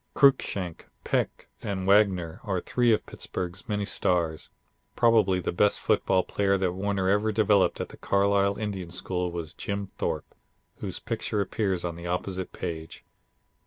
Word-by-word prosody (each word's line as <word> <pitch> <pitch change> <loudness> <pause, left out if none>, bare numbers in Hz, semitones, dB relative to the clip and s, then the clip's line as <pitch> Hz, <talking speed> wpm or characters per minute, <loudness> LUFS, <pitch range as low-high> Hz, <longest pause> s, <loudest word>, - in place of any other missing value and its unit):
Cruikshank, 100 - +2 0.2
Peck, - - -1
and 95 -2 -3
Wagner 95 -5 +3
are 95 -4 -1
three 120 +5 +2
of 110 - +2
Pittsburgh's 90 +1 -6
many 105 -1 0
stars. 85 -5 0 0.5
Probably 110 -6 +4
the 90 - -2
greatest 105 +3 +2
football 95 -1 +2
player 100 -1 +1
that 95 -2 0
Warner 95 0 -1
ever 105 +3 +3
developed 105 -2 +3
at - - -3
the - - -12
Carlisle 100 0 +2
Indian 100 -5 -4
School 90 0 -2
was 85 -1 -5
Jim 100 0 -3
Thorpe, - - -4 0.4
whose - - -4
picture 105 - -2
appears 95 -2 0
on 85 -1 -3
the 85 +1 -7
opposite 90 +1 -3
page. 80 -3 -6
95 Hz, 150 wpm, -27 LUFS, 90-100 Hz, 0.5 s, Probably